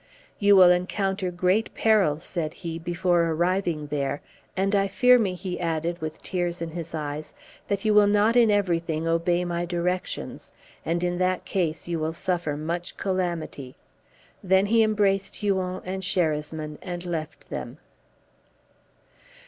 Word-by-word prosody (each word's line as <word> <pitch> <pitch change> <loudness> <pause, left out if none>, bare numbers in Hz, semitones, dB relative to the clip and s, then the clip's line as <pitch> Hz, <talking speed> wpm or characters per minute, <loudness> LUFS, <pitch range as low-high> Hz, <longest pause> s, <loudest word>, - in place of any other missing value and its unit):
"You 205 -1 +6
will 185 -2 +8
encounter 190 +1 0
great 185 +5 0
perils," 190 -9 +3
said 160 -4 -3
he, 165 -1 -5
"before 175 +1 +1
arriving 170 -1 0
there, 145 -1 -2 0.3
and 195 +2 +1
I 200 0 +3
fear 250 +4 +5
me," 195 -5 0
he 180 0 -5
added, 165 0 -2
with 155 0 -6
tears 175 -1 -2
in 165 -1 -4
his 165 0 -6
eyes, 150 0 -5 0.3
"that 200 +1 -2
you 215 - +4
will 210 -1 +6
not 210 +3 +3
in 235 -2 +6
everything 170 -5 0
obey 175 +2 +1
my 175 0 -2
directions, 175 +1 -3 0.3
and 170 +2 -1
in 175 0 -1
that 185 0 0
case 170 -4 -1
you 170 -1 -2
will 155 +1 -1
suffer 170 -4 -1
much 170 +3 -4
calamity." 170 -8 -3 0.7
Then 190 +1 +4
he 225 +2 +4
embraced 205 -3 +1
Huon 190 -3 -1
and 190 +1 -3
Sherasmin, 155 -4 -1
and 175 -1 -5
left 160 -3 -5
them. - - -5
175 Hz, 150 wpm, -25 LUFS, 165-195 Hz, 0.7 s, will